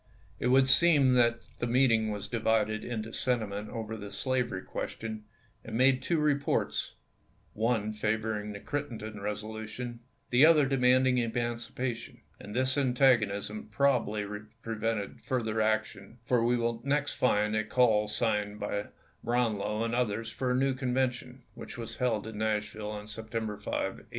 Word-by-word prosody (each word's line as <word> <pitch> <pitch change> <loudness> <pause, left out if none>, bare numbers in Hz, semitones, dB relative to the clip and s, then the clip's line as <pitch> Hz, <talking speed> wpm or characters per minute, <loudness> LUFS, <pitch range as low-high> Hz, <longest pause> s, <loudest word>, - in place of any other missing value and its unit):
It - - 0
would 130 +1 +5
seem 140 -2 +7
that 120 -1 +3
the 120 - -1
meeting 115 -3 +3
was 105 -1 -4
divided 110 -2 0
in 115 -3 -3
sentiment 105 -4 -1
over 110 -1 -5
the 100 -2 -8
slavery 125 -8 -1
question, 110 -1 -5 0.4
and 110 0 -4
made 130 +1 +4
two 165 +6 0
reports; 145 -2 0 0.6
one 110 -1 0
favor 110 +1 -1
ing 105 0 -6
the 100 - -7
Crittenden 110 -6 -5
resolution, 110 +3 -5 0.3
the 125 +3 +5
other 155 -2 +7
demanding 130 -1 +3
emancipation; 120 +1 -3 0.2
and 105 - -9
this 130 +2 +2
antagonism 115 -6 +2
probably 110 -4 +1 0.4
pre 115 - -3
vented 110 -2 -2
further 115 -5 -1
action, 110 0 -1
for 120 -1 +2
we 120 +1 +2 0.3
next 145 +1 0
find 105 -3 +1
a 110 - +1
caU 110 -1 +3
signed 105 -1 -1
by 100 -1 -3 0.4
Brownlow 110 -3 0
and 115 0 -2
others 115 -2 -1
for 130 - -2
a 125 - +2
new 135 +1 +2
Convention, 125 -1 -2
which - - -9
was 115 -2 -6
held 120 -5 0
in 110 -2 -7
Nashville 110 -1 -2
on 105 0 -6
September 110 0 -4
5, - - -9
1864. - - -3
115 Hz, 150 wpm, -30 LUFS, 110-125 Hz, 0.6 s, seem